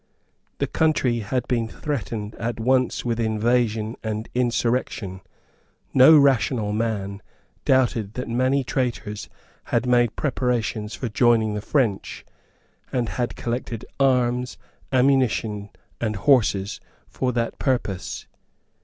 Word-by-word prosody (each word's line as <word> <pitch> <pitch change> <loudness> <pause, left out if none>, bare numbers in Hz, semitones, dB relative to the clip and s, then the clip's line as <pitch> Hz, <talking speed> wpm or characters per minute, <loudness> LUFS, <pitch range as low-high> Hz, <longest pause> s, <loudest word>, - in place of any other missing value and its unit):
The - - 0
country 140 -7 +1
had 120 +4 -2
been 115 -3 0
threatened 110 -6 -4
at 115 +1 -3
once 130 +2 +1
with 120 -1 -1
invasion 110 0 +1
and 110 0 -3
insurrection. 120 -5 -1 0.7
No 135 +5 +8
rational 125 -6 +3
man 105 -3 -2 0.4
doubted 120 -5 +2
that 125 - -4
many 130 +3 +1
traitors 120 -5 -3 0.4
had - - 0
made 120 -2 +3
preparations 120 -6 -1
for 125 - -4
joining 115 -1 +3
the 105 - -3
French, 115 -5 -1 0.7
and 120 -3 0
had 120 -1 -2
collected 120 -1 -4
arms, 125 -2 +2 0.3
ammunition 125 -6 +2 0.3
and 110 -2 -1
horses 100 -3 +2 0.3
for 130 -1 -1
that 115 -1 -2
purpose. 120 -9 -2
120 Hz, 110 wpm, -23 LUFS, 110-130 Hz, 0.7 s, No